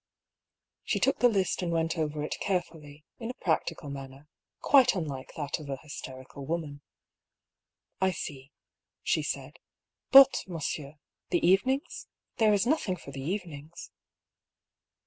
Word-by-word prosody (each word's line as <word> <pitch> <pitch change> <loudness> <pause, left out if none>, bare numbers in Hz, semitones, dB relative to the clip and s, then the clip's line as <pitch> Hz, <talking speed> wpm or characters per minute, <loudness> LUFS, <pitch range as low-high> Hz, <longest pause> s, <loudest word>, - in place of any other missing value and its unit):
She - - 0
took - - +2
the 245 - +6
list 195 -5 0
and 175 -2 -1
went 165 0 0
over 150 -2 -2
it 150 - -4
carefully, 155 -6 -3
in 230 -1 -5
a 250 - -5
practical 160 -4 -1
manner, 135 +1 -9 0.3
quite 265 -5 +5
unlike 145 -7 -4
that 145 -1 -2
of 150 -2 -9
a 135 - -2
hysterical 130 -1 -9
woman. 150 -1 -4 1.2
"I 190 - +4
see," 140 -5 -6 0.5
she - - +2
said. - - -5 0.5
"But, 270 0 +8
monsieur, 155 -4 -4 0.3
the 175 - +1
evenings? 260 - +1 0.3
There 220 -2 +5
is 205 +1 +3
nothing 245 -9 +1
for 140 - -11
the 135 - -6
evenings." 165 -1 -6
160 Hz, 135 wpm, -29 LUFS, 145-190 Hz, 1.2 s, But